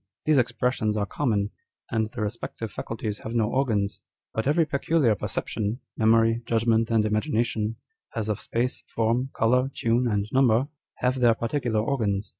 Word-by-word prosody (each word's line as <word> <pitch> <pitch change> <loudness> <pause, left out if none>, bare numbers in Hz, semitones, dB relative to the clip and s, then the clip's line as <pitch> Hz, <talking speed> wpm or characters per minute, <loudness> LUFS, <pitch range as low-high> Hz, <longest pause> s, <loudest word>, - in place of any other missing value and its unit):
These 155 -3 +4
expressions 120 -3 0
are 105 - +1
common, 105 -3 0 0.4
and 110 -1 0
the 115 -2 -4
respective 110 0 -5
faculties 110 -2 -4
have 115 - -6
no 110 -2 +3
organs; 110 -7 0 0.3
but 110 +3 -1
every 160 +3 +3
peculiar 140 -3 +2
perception 105 +1 -2
â€" - - -8 0.2
memory, 115 +1 +3
judgment, 115 0 +2
and 115 -2 +3
imagi 110 +7 0
nationâ€" 110 -2 0 0.4
as 110 -2 -2
of 105 -2 -1
space, 120 +2 -2
form, 115 +4 0
colour, 125 +3 +3
tune, 120 +2 +1
and 105 -2 0
number, 130 -1 +4 0.3
have 130 +1 +1
their 120 -2 +5
particular 115 -1 -1
organs. 110 -5 -1
115 Hz, 160 wpm, -26 LUFS, 110-125 Hz, 0.4 s, their